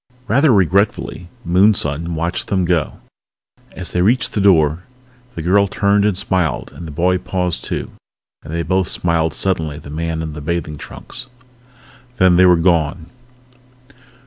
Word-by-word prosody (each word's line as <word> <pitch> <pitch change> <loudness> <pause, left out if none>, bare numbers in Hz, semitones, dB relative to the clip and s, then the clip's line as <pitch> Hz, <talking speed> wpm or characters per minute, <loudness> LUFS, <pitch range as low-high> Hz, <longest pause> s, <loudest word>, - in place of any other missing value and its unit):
Rather 140 +7 +4
regretfully 95 -2 +1 0.2
Moonson 85 -4 +1
watched 85 +3 -2
them 95 -3 0
go. 85 -5 -1 0.7
As 90 -2 -6
they 90 - 0
reached 115 +7 +2
the 105 - 0
door 80 -4 +3 0.5
the 80 - -5
girl 100 +4 +3
turned 100 +1 +2
and 105 -4 +1
smiled 90 -7 -1
and 85 - -9
the - - -7
boy 90 +4 +1
paused 90 -2 -2
too - - -4 0.5
and 75 - -10
they 85 0 -2
both 95 +3 0
smiled 85 -2 0
suddenly 80 -6 -1
at 75 - -11
the 75 - -9
man 80 +1 -3
in 80 -1 -5
the 75 - -7
bathing 75 0 -3
trunks. 125 - -9 0.9
Then 95 -1 +5
they 95 +1 +6
were 90 - +6
gone. 85 -1 0
90 Hz, 155 wpm, -18 LUFS, 80-95 Hz, 0.9 s, they